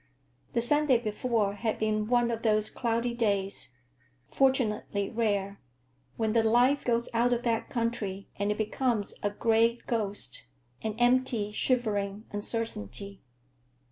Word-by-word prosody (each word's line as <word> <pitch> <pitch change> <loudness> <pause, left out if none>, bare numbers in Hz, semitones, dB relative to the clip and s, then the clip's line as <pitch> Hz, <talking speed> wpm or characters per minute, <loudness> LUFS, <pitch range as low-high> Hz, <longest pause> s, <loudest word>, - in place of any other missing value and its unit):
The 235 - +2
Sunday 295 +1 +3
before 220 -2 -1
had 220 +1 -2
been 215 -1 0
one 240 0 +2
of 230 -1 -3
those 215 -1 +1
cloudy 235 0 -1
days—fortunately 195 - -1
rare—when 195 - -3
the 230 +1 +4
life 245 +5 +3
goes 235 -1 +1
out 235 +2 +2
of 240 0 0
that 230 -2 0
country 220 -5 -2
and 205 0 0
it 210 - -2
becomes 220 0 -1
a 205 - +1
gray 225 +2 +2
ghost, 205 - -1 0.3
an 215 -1 -3
empty, 240 -3 +2
shivering 210 -3 0
uncertainty. 205 - -3
220 Hz, 120 wpm, -29 LUFS, 200-235 Hz, 0.3 s, the